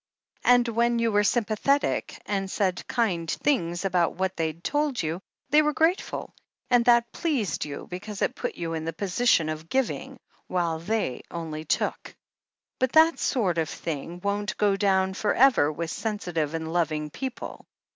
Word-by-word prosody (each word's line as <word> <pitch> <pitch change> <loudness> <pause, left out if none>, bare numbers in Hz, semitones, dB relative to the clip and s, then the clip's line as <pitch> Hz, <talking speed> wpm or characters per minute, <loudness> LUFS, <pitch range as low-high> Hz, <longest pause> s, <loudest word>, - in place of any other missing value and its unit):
And 245 -1 +5
when 235 +1 +2
you 230 -1 +1
were 205 0 +3
sympathetic, 240 +6 +1
and 195 -2 -2
said 190 -2 -1
kind 185 -9 0
things 175 - 0
about 180 -3 +1
what 190 +1 -1
they'd 160 +1 -3
told 290 -3 0
you, 160 +4 -3 0.3
they 300 +1 +7
were 300 0 +1
grateful, 330 +5 0 0.4
and 245 -1 +5
that 235 -1 +4
pleased 280 - -1
you, 145 -1 -7
because^ 200 +3 -5
it - - +1
put - - -4
you 165 -1 -4
in 160 -1 -3
the 165 - -3
position 190 -1 +2
of 155 +1 -5
giving, 265 -2 -1 0.3
while 170 -3 0
they 185 - -2
only 160 -2 -5
took. - - -2 0.6
But 260 -1 +1
that 320 +1 +6
sort 190 - +1
of 160 - -1
thing 165 +2 -5
won't 205 +1 -1
go 205 -2 +3
down 190 -1 +2
for 205 +2 0
ever 250 - +5
with 165 +2 -4
sensitive 175 -8 -2
and 160 0 -4
loving 155 -3 0
people. 260 - -6
195 Hz, 165 wpm, -26 LUFS, 165-235 Hz, 0.6 s, they